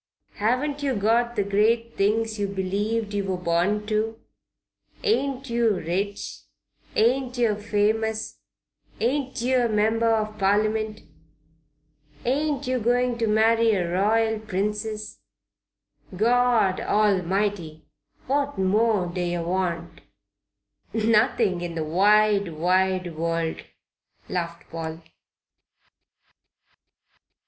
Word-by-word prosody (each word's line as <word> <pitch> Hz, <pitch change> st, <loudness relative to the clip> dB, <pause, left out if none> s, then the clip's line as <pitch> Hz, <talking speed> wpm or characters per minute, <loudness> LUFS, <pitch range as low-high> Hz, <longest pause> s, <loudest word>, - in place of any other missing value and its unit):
"Haven't 260 Hz, +7 st, 0 dB
yer 275 Hz, -3 st, 0 dB
got 230 Hz, +3 st, +1 dB
the 205 Hz, -, +1 dB
great 225 Hz, +4 st, +1 dB
things 215 Hz, +2 st, 0 dB
yer 200 Hz, -, 0 dB
believed 205 Hz, +3 st, -2 dB
yer 200 Hz, -1 st, 0 dB
were 190 Hz, -1 st, -2 dB
born 180 Hz, +4 st, 0 dB
to? 220 Hz, +1 st, -1 dB, 0.8 s
Ain't 275 Hz, -, 0 dB
yer 235 Hz, -3 st, +2 dB
rich? 195 Hz, +5 st, -3 dB, 0.6 s
Ain't 250 Hz, +2 st, +1 dB
yer 230 Hz, -4 st, +2 dB
famous? 220 Hz, +1 st, -1 dB, 0.6 s
Ain't 265 Hz, +2 st, -1 dB
yer 250 Hz, -1 st, +2 dB
a -, -, -7 dB
Member 220 Hz, +2 st, +2 dB
of 215 Hz, -1 st, -1 dB
Parliament? 215 Hz, +2 st, +1 dB, 1.2 s
Ain't 285 Hz, +2 st, 0 dB
yer 255 Hz, 0 st, 0 dB
going 245 Hz, +1 st, +1 dB
to 225 Hz, -, +1 dB
marry 225 Hz, +1 st, +3 dB
a 175 Hz, -3 st, -1 dB
Royal 220 Hz, +4 st, +2 dB
Princess? 210 Hz, +1 st, -3 dB, 0.9 s
Good 185 Hz, -, -10 dB
God 235 Hz, -3 st, +3 dB
Almighty! 195 Hz, -5 st, 0 dB, 0.4 s
what 280 Hz, -1 st, -1 dB
more 205 Hz, +1 st, +2 dB
d'yer 175 Hz, -1 st, -2 dB
want?" 170 Hz, -1 st, -3 dB, 0.9 s
"Nothing 220 Hz, -4 st, +2 dB
in 175 Hz, -1 st, -5 dB
the 160 Hz, -, -2 dB
wide, 200 Hz, +4 st, +3 dB
wide 180 Hz, +1 st, +1 dB
world!" 165 Hz, 0 st, -2 dB, 0.7 s
laughed 170 Hz, -1 st, -4 dB
Paul. 165 Hz, 0 st, -6 dB
210 Hz, 105 wpm, -24 LUFS, 185-230 Hz, 1.2 s, marry